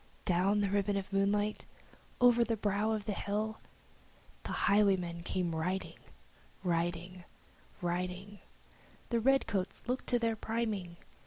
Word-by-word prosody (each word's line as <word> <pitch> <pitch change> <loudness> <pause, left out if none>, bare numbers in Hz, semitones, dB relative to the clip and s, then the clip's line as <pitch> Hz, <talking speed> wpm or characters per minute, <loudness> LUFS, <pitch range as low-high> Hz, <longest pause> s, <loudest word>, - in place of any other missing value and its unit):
Down 190 +4 +3
the 200 - +1
ribbon 200 0 +1
of 195 0 -5
moonlight, 205 +2 +1 0.5
over 245 -1 +6
the 230 -1 -1
brow 205 +1 +1
of 215 -2 -1
the 215 - -1
hill, 215 +2 -2 0.8
The - - -6
highwayman 190 -4 +3
came 175 -1 -1
riding 180 +4 -2 0.6
Riding 175 +1 -1 0.6
riding 180 +3 -3 0.7
The 235 - +2
redcoats 225 -6 +1
looked 250 +1 -2
to 245 - +3
their 230 -1 +1
priming! 215 -6 -2
200 Hz, 125 wpm, -33 LUFS, 180-220 Hz, 0.8 s, over